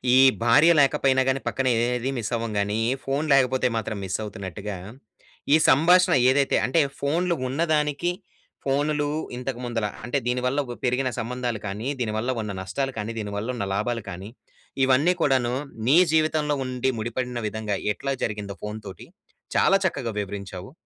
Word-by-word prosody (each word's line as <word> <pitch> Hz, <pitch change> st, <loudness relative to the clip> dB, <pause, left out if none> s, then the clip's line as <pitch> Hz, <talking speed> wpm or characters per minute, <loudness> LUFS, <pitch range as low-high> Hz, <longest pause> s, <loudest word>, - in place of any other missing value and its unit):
ఈ -, -, +7 dB, 0.3 s
భార్య 145 Hz, +9 st, +6 dB
లేకపోయినా 135 Hz, -1 st, +3 dB
కానీ 130 Hz, +1 st, +1 dB
పక్కన 135 Hz, -1 st, 0 dB, 0.2 s
ఏది 125 Hz, +1 st, -1 dB
మిస్ 115 Hz, -1 st, -3 dB
అవ్వము 115 Hz, -2 st, -3 dB
గాని. 105 Hz, +2 st, 0 dB, 0.2 s
ఫోన్ 140 Hz, +3 st, -1 dB
లేకపోతే 130 Hz, -1 st, +3 dB
మాత్రం 110 Hz, -1 st, -3 dB
మిస్ 95 Hz, -1 st, -2 dB
అవుతున్నట్టుగా. 100 Hz, 0 st, -6 dB, 0.8 s
ఈ -, -, +9 dB
సంభాషణ 175 Hz, +6 st, +5 dB, 0.2 s
ఏదైతే, 135 Hz, +1 st, +2 dB
అంటే 130 Hz, +6 st, +2 dB, 0.2 s
ఫోన్‌లు 170 Hz, +5 st, 0 dB
ఉన్నదానికి, 150 Hz, +3 st, 0 dB, 0.5 s
ఫోన్‌లు 145 Hz, +2 st, +1 dB, 0.3 s
ఇంతకు 125 Hz, -1 st, -4 dB
ముందుల 115 Hz, -3 st, -2 dB, 0.2 s
అంటే 125 Hz, +3 st, -1 dB
దీనివల్ల 125 Hz, +2 st, 0 dB
ఒక 120 Hz, -, -7 dB
పెరిగిన 130 Hz, +1 st, +1 dB
సంబంధాలు 120 Hz, -1 st, -3 dB
కానీ, 105 Hz, +6 st, -4 dB
దీనివల్ల 110 Hz, +2 st, -1 dB
ఉన్న 105 Hz, -2 st, -4 dB
నష్టాలు 135 Hz, +8 st, -3 dB
కానీ, 110 Hz, +2 st, -4 dB
దీనివల్ల 105 Hz, +1 st, -4 dB
ఉన్న 100 Hz, -4 st, -3 dB
లాభాలు 115 Hz, +2 st, -1 dB
కానీ, 95 Hz, +3 st, -7 dB, 0.6 s
ఇవన్నీ 140 Hz, +7 st, +4 dB
కూడాను 130 Hz, -4 st, +2 dB, 0.3 s
నీ 150 Hz, +6 st, +6 dB, 0.2 s
జీవితంలో 155 Hz, -2 st, +2 dB
ఉండి, 130 Hz, +1 st, -1 dB
ముడిపడిన 120 Hz, +2 st, -3 dB
విధంగా 105 Hz, -1 st, -3 dB, 0.2 s
ఎట్లా 135 Hz, +5 st, -3 dB
జరిగిందో 105 Hz, -2 st, -5 dB
ఫోన్ 105 Hz, +1 st, -5 dB
తోటి 95 Hz, -, -10 dB, 0.5 s
చాలా 195 Hz, -, +4 dB
చక్కగా 130 Hz, -10 st, -1 dB
వివరించావు. 100 Hz, +1 st, -7 dB
125 Hz, 145 wpm, -25 LUFS, 110-140 Hz, 0.8 s, ఈ